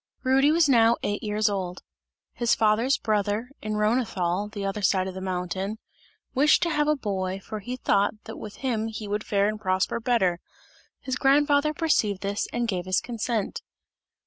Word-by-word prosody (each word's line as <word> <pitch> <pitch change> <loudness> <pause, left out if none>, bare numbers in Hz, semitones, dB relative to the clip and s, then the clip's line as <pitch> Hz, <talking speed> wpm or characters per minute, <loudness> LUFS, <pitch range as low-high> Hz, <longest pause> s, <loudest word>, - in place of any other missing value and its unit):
Rudy 270 +2 +4
was 325 -1 +4
now 235 -3 +5
eight 205 0 -1
years 210 0 0
old. 185 -3 -3 0.5
His 235 -1 +2
father's 225 +5 +2
brother, 215 +3 -1
in 215 0 -3
Rhonethal, 210 -3 0
the 205 -2 -5
other 195 +2 -2
side 190 -1 +2
of 190 - -5
the 190 - -7
mountain, 190 +3 -3 0.6
wished 295 +6 +4
to 340 - 0
have 295 -1 +1
the 305 - +3
boy, 190 -6 -3
for 215 +2 -7
he 245 +5 -5
thought 200 -4 +1
that - - -8
with 210 -1 -8
him 225 -4 0
he 215 -1 -6
would 205 +1 -2
fare 200 0 +1
and 215 0 -3
prosper 185 +3 0
better; 225 -8 +1 0.6
his 260 -2 -3
grandfather 285 +2 +3
perceived 260 - +1
this 200 +1 -2
and 240 0 -1
gave 180 -5 -2
his 185 - +2
consent. 230 -2 -3
215 Hz, 175 wpm, -26 LUFS, 195-250 Hz, 0.6 s, now